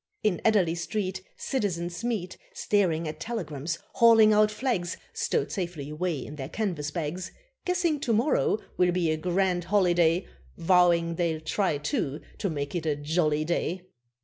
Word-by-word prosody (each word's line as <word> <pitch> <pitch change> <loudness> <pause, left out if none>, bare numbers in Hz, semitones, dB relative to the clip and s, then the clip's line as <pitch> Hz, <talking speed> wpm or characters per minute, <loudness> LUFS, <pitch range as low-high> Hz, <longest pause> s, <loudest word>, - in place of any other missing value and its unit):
In 210 -5 +1
Adderley 200 -7 +3
Street 185 +2 -3 0.2
Citizens 180 -7 -2
meet, 220 -7 -2 0.2
Staring 185 - +1
at 155 0 -6
telegrams, 165 - -4 0.2
hauling 225 -2 +6
out 210 0 +5
flags, 210 -6 -2 0.2
Stowed 460 - -1
safely 170 -7 -4
away 155 -3 -2
in 150 - -9
their 135 -1 -5
canvas 175 -10 -2
bags, 170 +4 -4 0.3
Guessing 355 -4 +1
to 255 - -1
morrow 230 0 +2 0.2
will 180 -1 +4
be 175 -3 +1
a 155 - 0
grand 180 +1 0
holiday, 175 -3 +3 0.3
Vowing 170 -1 +3
they'll 165 -3 0
try, 160 +1 0
too, 145 0 -2 0.2
to 200 - -1
make 145 -3 -3
it 165 -3 -2
a 150 - +2
jolly 155 +1 0
day. 175 +2 -1
175 Hz, 150 wpm, -27 LUFS, 160-210 Hz, 0.3 s, hauling